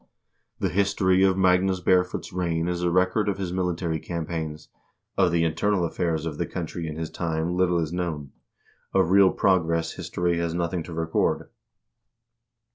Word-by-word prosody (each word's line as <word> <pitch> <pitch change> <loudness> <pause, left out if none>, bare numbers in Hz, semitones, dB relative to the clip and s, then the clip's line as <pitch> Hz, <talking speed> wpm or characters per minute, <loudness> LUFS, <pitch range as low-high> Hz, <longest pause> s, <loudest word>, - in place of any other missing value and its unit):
The - - 0
history 95 -1 +2
of 95 -1 +3
Magnus 95 0 +3
Barefoot's 90 0 +1
reign 85 -2 -1
is 90 0 -2
a 90 - +1
record 95 +4 +2
of 100 - -1
his 95 -3 -3
military 90 -3 -1
campaigns; 80 -2 -5 0.5
of 90 - +3
the 85 0 +2
internal 90 +3 +1
affairs 80 -1 -1
of 75 -3 -5
the - - -1
country 85 -1 -5
in 75 - -5
his 80 0 -5
time 85 0 -2
little 90 -1 +2
is 80 -1 -2
known; 80 -6 -3 0.6
of 85 - +3
real 100 -1 +7
progress 85 -4 +1
history 85 -1 -1
has 85 -1 -2
nothing 85 0 -1
to 85 - -8
record. 80 0 0
85 Hz, 160 wpm, -25 LUFS, 80-90 Hz, 0.6 s, real